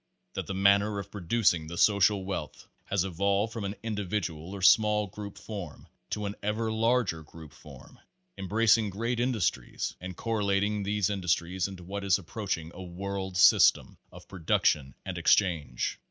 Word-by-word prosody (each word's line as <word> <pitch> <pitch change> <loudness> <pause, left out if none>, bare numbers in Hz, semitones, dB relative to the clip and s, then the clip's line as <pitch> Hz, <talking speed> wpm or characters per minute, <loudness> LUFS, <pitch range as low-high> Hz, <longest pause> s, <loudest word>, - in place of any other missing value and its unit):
That - - -4
the 95 - -4
manner 100 +2 +3
of 100 0 -6
producing 90 -4 +1
the 85 +2 -7
social 100 -1 +3
wealth 95 -6 -5 0.2
has 100 -2 0
evolved 100 +4 0
from 110 -4 -4
an 100 +1 -4
individual 95 -5 -3
or 95 - -7
small 105 +1 +5
group 100 +1 -9
form 95 - -8 0.2
to 105 - -3
an 100 - -3
ever 110 +2 -1
larger 110 -6 +1
group 80 0 -13
form, - - -15 0.4
embracing 110 +2 +2
great 115 +5 -2
industries 120 -7 -1
and 90 -1 -7
correlating 105 -2 0
these 105 0 0
industries 90 -1 -1
into 95 -2 -10
what 100 +3 -5
is 100 -1 +3
approach 100 +2 -3
ing 80 0 -9
a 95 - -9
world 95 +1 -5
system 90 - +5 0.2
of - - -14
production 75 -6 0
and - - -4
exchange. 80 -11 +1
100 Hz, 155 wpm, -28 LUFS, 90-105 Hz, 0.4 s, small